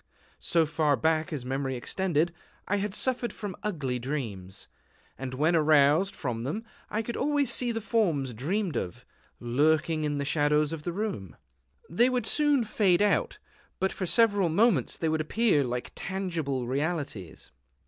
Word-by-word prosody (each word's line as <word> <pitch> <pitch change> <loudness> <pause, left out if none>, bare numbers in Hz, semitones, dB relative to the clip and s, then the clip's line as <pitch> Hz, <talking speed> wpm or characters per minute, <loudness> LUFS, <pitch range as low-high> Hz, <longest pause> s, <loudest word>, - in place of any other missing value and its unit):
So 170 -3 +2
far 150 -1 +1
back 160 +6 0
as 140 -5 -4
memory 135 0 -2
extended, 170 +5 0 0.3
I 205 - +1
had 200 0 -2
suffered 250 -1 0
from 205 -4 -6
ugly 145 -12 -2
dreams; 105 -8 -5 0.5
and 130 -1 -6
when 155 +5 +2
aroused 155 +4 +4
from 120 -5 -3
them 200 - -3 0.3
I 220 +2 -1
could 235 +2 -4
always 285 -3 +1
see 245 -1 0
the 225 -1 -3
forms 165 - 0
dreamed 170 - -2
of, 90 - -4 0.3
lurking 155 +6 +1
in 145 -1 -1
the 140 - -2
shadows 150 +1 +2
of 160 - -5
the 175 - -1
room. 170 - -4 0.5
They 235 +10 +3
would 250 -1 -1
soon 295 -4 +3
fade 205 -3 +2
out; 205 - +1 0.4
but 190 - 0
for 185 - -3
several 205 -3 +4
moments 180 - +2
they 165 - -1
would 160 0 +1
appear 175 -2 +2
like 125 -1 -4
tangible 165 -9 -3
realities. 135 - -3
160 Hz, 160 wpm, -28 LUFS, 140-205 Hz, 0.5 s, aroused